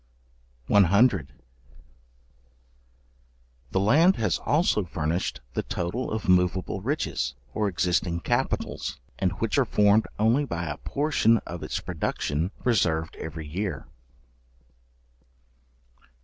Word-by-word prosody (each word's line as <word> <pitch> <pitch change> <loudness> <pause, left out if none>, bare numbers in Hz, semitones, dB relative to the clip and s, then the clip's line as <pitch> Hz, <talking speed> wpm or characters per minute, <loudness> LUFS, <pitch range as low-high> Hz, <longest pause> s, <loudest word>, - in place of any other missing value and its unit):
§100. 100 - +4 2.4
The 95 - 0
land 155 - +5
has 110 - 0
also 150 - +2
furnished 85 -2 -2
the - - 0
total 90 +9 -3
of 110 0 -3
moveable 90 +1 +2
riches, 145 +9 -2 0.2
or 105 -1 0
existing 85 -2 0
capitals, - - -2 0.2
and - - +1
which - - 0
are - - +5
formed 105 +1 +3
only 115 +7 +3
by 85 -11 -3
a 75 -1 -4
portion 140 -6 +2
of 85 0 -7
its - - -3
production 75 +5 -2 0.2
reserved 85 -9 +1
every 80 0 -6
year. 95 +6 -4
95 Hz, 105 wpm, -26 LUFS, 85-115 Hz, 2.4 s, land